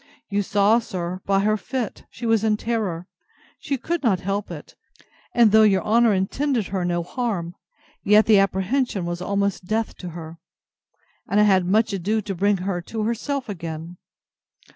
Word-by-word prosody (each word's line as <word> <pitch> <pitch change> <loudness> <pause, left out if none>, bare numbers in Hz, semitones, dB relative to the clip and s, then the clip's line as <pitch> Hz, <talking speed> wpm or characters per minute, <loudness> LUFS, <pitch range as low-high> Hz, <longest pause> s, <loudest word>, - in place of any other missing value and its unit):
You 200 +1 +1
saw, 205 +3 +3
sir, 185 -4 -5
by 195 0 +3
her 215 +1 +2
fit, 245 -1 -5
she 235 - -8
was 225 -2 +2
in 215 -1 +2
terror; 210 -7 -2 0.5
she 275 - -2
could 335 +7 -2
not 215 -9 +2
help 200 +2 -2
it; - - -9 0.6
and 235 -3 +6
though 220 +1 +6
your 200 -3 +4
honour 230 +1 +4
intended 225 +5 0
her 190 -2 -2
no 175 -1 -1
harm, 180 -5 -3 0.5
yet 210 +2 +5
the 215 -3 +6
apprehension 195 +2 0
was 175 0 -4
almost 200 -1 -1
death 220 +2 -1
to 180 - -7
her: 165 0 -9 0.9
and 205 - +2
I - - +6
had 190 -3 +3
much 215 +2 +2
ado 200 +4 0
to 210 -2 -4
bring 200 +2 +1
her 185 -3 -1
to 220 +5 -4
herself 250 +5 -2
again. 165 -3 -6
200 Hz, 170 wpm, -23 LUFS, 185-225 Hz, 0.9 s, and